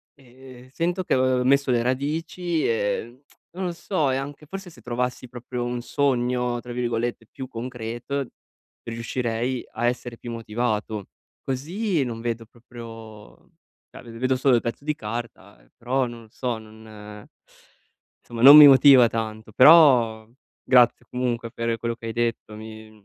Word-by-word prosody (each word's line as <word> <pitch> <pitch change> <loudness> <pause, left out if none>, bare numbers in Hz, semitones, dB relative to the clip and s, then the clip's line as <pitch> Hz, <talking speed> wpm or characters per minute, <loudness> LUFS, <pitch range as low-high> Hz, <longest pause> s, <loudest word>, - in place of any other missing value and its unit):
ehm, 130 -1 -16
sento 175 +7 -2
che, - - -1
uhm, 130 -1 +2
ho - - 0
messo 140 +1 +2
le 120 -1 +2
radici, 160 +6 -2
ehm, 115 +3 -2 0.3
non 190 +1 -3
lo 180 - -2
so, 170 -4 -1
e - - 0
anche 145 +2 -7
forse 195 +1 -8
se 125 - -17
trovassi 125 +2 -3
proprio 120 0 -6
un 120 0 -3
sogno, 125 -2 0
tra 120 +1 -10
virgolette 120 -1 -3
"più 130 - -8
concreto", 125 +3 -5 0.6
riuscirei 115 +1 -3
a 120 - -2
essere 120 -1 -4
più 120 - -8
motivato. 110 -2 -3 0.4
Così 165 - -2
non 115 -2 -5
vedo 115 -1 -4
proprio 115 - -13 0.4
cioè - - -12
v 115 -1 -11
vedo 130 +2 0
solo 130 0 +3
il 120 - +1
pezzo 115 +4 -5
di 150 0 -1
carta, 115 -4 -7
ehm, - - -27
però 125 +2 -1
non 120 -1 -10
lo - - -18
so, 125 -2 -3
non 110 -1 -13 1.0
somma 115 -1 -8
non 140 +4 +11
mi 150 - +11
motiva 135 -2 +7
tanto. 110 -1 -5
Però 125 -6 +6 0.4
grazie 120 -1 +4
comunque 120 -2 -3
per 115 0 -2
quello 115 0 -3
che 115 - -9
hai 115 - -4
detto, 115 -2 -2
mi 110 0 -11
120 Hz, 160 wpm, -24 LUFS, 115-130 Hz, 1.0 s, non